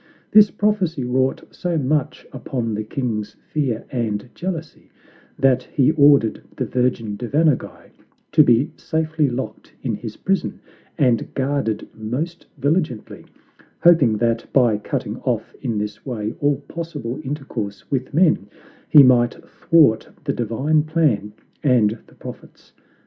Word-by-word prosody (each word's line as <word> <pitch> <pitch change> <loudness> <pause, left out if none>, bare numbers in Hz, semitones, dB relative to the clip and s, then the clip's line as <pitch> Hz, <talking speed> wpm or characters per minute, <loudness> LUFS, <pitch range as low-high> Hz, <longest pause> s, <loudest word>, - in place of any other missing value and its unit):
This 210 -1 +7
prophecy 190 -9 0
wrought 130 +2 0
so 175 -2 -2
much 145 0 -1
upon 115 -4 -3
the 105 +1 -2
king's 110 -3 -3 0.2
fear 130 -7 -1
and 115 -2 -2
jealousy, 170 -3 -6 0.5
that 130 -2 +3
he 135 +2 +2
ordered 140 -7 +4 0.2
the - - -1
virgin 120 -4 -1
Devanaguy 140 +6 -1 0.4
to - - +6
be 120 +5 +3
safely 160 -2 0
locked 125 +2 -6
in - - -1
his - - -6
prison, 195 0 -1 0.4
and 125 -7 +2
guarded 135 -5 -1
most 135 +11 -4
vigilantly, 145 - -1 0.6
hoping 150 -11 +5
that 115 0 -1
by 120 -6 +3
cutting 105 - -4
off - - -2
in 115 -3 -2
this 105 0 -4
way 110 -4 -4
all 145 -1 +1
possible 150 -7 -6
intercourse 130 -8 -5
with 130 -2 -1
men, 160 - +2 0.4
he 145 - +9
might 120 -2 +4
thwart 150 -10 +3
the - - -1
divine 130 +7 +1
plan 150 -10 +1 0.3
and 115 -5 +3
the - - -21
prophets. - - -12
130 Hz, 130 wpm, -21 LUFS, 115-155 Hz, 0.6 s, he